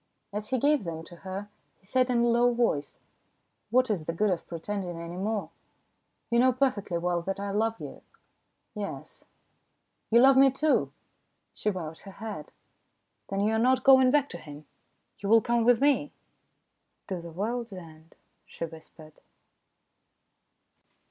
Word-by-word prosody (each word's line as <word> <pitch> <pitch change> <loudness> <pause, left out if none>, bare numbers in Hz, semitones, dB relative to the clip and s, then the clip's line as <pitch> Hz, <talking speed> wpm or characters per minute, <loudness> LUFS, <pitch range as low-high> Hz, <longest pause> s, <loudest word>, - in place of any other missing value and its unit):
As 210 +1 -4
he 260 - +1
gave 290 0 +2
them 165 -2 -5
to 175 +1 -13
her, 190 +2 -6 0.3
he - - -30
said 255 +5 +1
in 240 -1 +2
a - - +3
low 240 +1 +4
voice: 230 -12 -1 0.3
" - - -48
What 255 +1 +3
is 175 -7 -2
the 165 - -2
good 205 +4 +1
of 175 - -3
pretending 175 0 -5
any 170 +1 -7
more? 205 +3 -2 0.8
You 235 - +3
know 255 +1 +5
perfectly 245 -9 0
well 175 0 0
that 195 +3 -4
I 200 0 -3
love 225 +2 0
you." - - -9 0.7
"Yes." 205 -2 -7 0.8
"You 235 - +5
love 265 +1 +7
me, 270 0 +7
too?" 285 +3 +1 0.6
She 210 - -1
bowed 165 -5 -5
her 195 - -12
head. 210 -7 -7 0.4
" - - -49
Then 195 0 -1
you 215 +2 +2
are 220 - +2
not 255 +2 +3
going 260 -1 +7
back 285 0 +3
to 175 - -7
him? 150 -1 -11 0.5
You 200 - -4
will 225 +1 +7
come 235 +1 +1
with 240 -1 +5
me? 285 0 +2 0.3
" - - -48
" - - -50
To 185 -3 -4
the 170 - -9
world's 225 +7 -3
end," 165 -3 -12 0.3
she - - -5
whispered. 160 -1 -14
210 Hz, 170 wpm, -28 LUFS, 175-245 Hz, 0.8 s, love